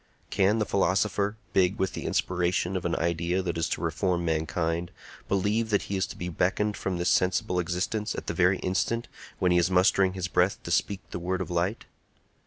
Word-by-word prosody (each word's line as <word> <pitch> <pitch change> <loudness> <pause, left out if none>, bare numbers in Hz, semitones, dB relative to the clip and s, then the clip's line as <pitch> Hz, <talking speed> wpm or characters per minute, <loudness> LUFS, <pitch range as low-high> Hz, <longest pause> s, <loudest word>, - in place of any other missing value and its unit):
Can 100 +3 +3
the 105 - +1
philosopher, 100 +2 +1 0.2
big 95 +1 +3
with 95 - -1
the - - -5
inspiration 90 0 0
of 90 - -3
an 85 - 0
idea 85 +2 0
that 85 -2 -2
is 80 - -1
to - - -2
reform 85 +2 0
mankind, 80 +1 -1 0.4
believe 105 +4 +1
that 100 -2 +2
he 100 - -4
is 95 - 0
to - - -9
be 90 - -4
beckoned 95 +5 0
from 95 -2 -3
this 85 - -1
sensible 90 0 +2
existence 90 +5 -2
at - - -5
the - - -2
very 95 +1 +3
instant 100 +6 -1 0.3
when 90 - +2
he 90 - +5
is 85 +1 +2
mustering 95 +1 +3
his 95 -1 -3
breath 90 +2 +2
to 85 - -5
speak 95 +2 +1
the - - -4
word 90 +2 -2
of 95 - -4
light? 90 +5 -1
90 Hz, 200 wpm, -27 LUFS, 85-95 Hz, 0.4 s, he